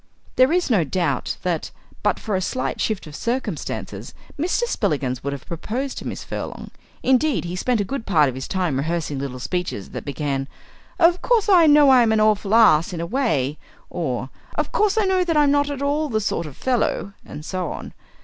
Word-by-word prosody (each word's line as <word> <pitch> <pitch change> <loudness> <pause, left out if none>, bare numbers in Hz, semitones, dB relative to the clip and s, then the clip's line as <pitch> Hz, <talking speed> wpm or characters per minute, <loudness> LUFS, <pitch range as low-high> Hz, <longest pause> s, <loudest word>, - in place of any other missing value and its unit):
There 255 +3 +5
is 350 -5 +1
no 195 -7 +4
doubt 155 -4 -1
that, 175 -3 -1 0.3
but - - +1
for 210 -3 -2
a 185 - 0
slight 255 +7 -2
shift 215 -3 -1
of 150 -2 -10
circumstances, 245 +8 -4 0.2
Mr. 350 +10 0
Spillikins 135 - -1
would 140 - -2
have 140 0 -7
proposed 235 - -4
to - - -7
Miss - - -5
Furlong. - - -6 0.3
Indeed, 265 -2 +2
he 175 +1 -4
spent 240 +5 0
a - - +2
good 235 +3 -5
part 155 -7 +4
of 130 - -2
his 130 +1 -6
time 180 -8 -1
rehearsing 155 -1 -2
little 135 -2 -4
speeches 170 - -3
that - - -6
began, 140 -1 -2 0.5
"Of 350 0 +4
course 460 -4 +2
I 350 -5 +7
know 295 -2 +7
I'm 240 -4 +5
an 220 - +3
awful 215 -1 +3
ass 175 -7 +5
in 170 - -4
a 170 - -2
way," 165 - 0 0.3
or, 130 -6 -3 0.2
"Of - - -1
course 425 0 +2
I 435 - +3
know 375 -1 +2
that 330 -3 0
I'm 290 -1 +5
not 285 0 +2
at 280 -1 -4
all 295 +2 0
the 220 -3 0
sort 185 -6 -2
of 140 - -11
fellow," 240 -5 0
and 150 - -9
so 185 -3 -3
on. - - -7
205 Hz, 205 wpm, -22 LUFS, -, 0.5 s, I